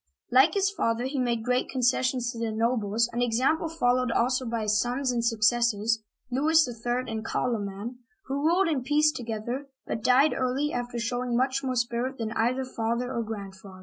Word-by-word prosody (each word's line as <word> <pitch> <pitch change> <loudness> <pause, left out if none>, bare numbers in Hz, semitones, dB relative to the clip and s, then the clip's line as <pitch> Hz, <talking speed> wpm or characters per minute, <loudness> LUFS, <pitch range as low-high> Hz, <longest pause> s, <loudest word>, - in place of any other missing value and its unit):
Like 265 +8 +5
his 395 0 +2
father, 230 - -1
he 270 +1 -2
made 235 -3 0
great 250 0 +1
concessions 250 -1 +1
to 230 - -8
the 230 -1 -1
nobles, 225 0 +1
an 240 - -1
example 260 +8 +1
followed 255 -6 +1
also 255 +2 +1
by 230 -1 -2
his 210 0 +2
sons 250 +2 -1
and 235 -1 -1
suc 230 -2 0
cessors, 230 -1 +2 0.3
Louis 310 +4 +4
III. 240 +1 -2
and 220 -1 -4
Car'loman, 225 0 -3 0.2
who 275 +1 -3
ruled 345 +4 +3
in 300 -5 0
peace 300 +4 +3
to 250 - -7
gether, 235 +5 -4 0.2
but 225 - -3
died 265 +4 +5
early, 265 +4 -1
after 245 0 -3
showing 245 +1 -1
much 265 +2 0
more 260 -1 -1
spirit 245 +2 -1
than 220 -2 -3
either 245 +4 0
father 240 +1 -2
or 235 - -1
grandfather. 195 -3 -8
245 Hz, 185 wpm, -27 LUFS, 230-260 Hz, 0.3 s, Like